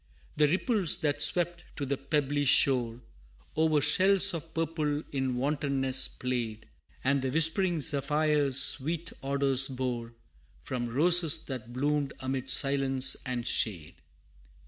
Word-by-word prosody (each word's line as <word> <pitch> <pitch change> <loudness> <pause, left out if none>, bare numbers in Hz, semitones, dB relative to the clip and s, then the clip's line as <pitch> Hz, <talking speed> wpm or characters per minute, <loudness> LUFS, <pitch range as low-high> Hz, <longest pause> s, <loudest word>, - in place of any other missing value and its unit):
The 150 0 +3
ripples 190 - +1
that 145 -2 -1
swept 175 +2 +1
to 140 - -5
the 140 +1 -2
pebbly 145 +1 -2
shore, 125 -3 +2 0.5
O'er 155 -1 +1
shells 185 +7 +3
of 165 0 -7
purple 155 -2 -3
in 130 -2 -3
wantonness 135 -1 0
played, 120 -4 -5 0.4
And 140 +1 0
the 130 - -3
whispering 165 +4 +2
zephyrs 145 -1 +1
sweet 160 +5 +3
odors 135 -1 +2
bore, 125 -3 -5 0.4
From 120 -2 -5
roses 165 +4 +2
that 120 -4 -8
bloomed 140 +2 -2
amid 130 0 -5
silence 135 -1 +1
and 125 -2 -4
shade. 85 -8 0
140 Hz, 125 wpm, -28 LUFS, 130-155 Hz, 0.5 s, The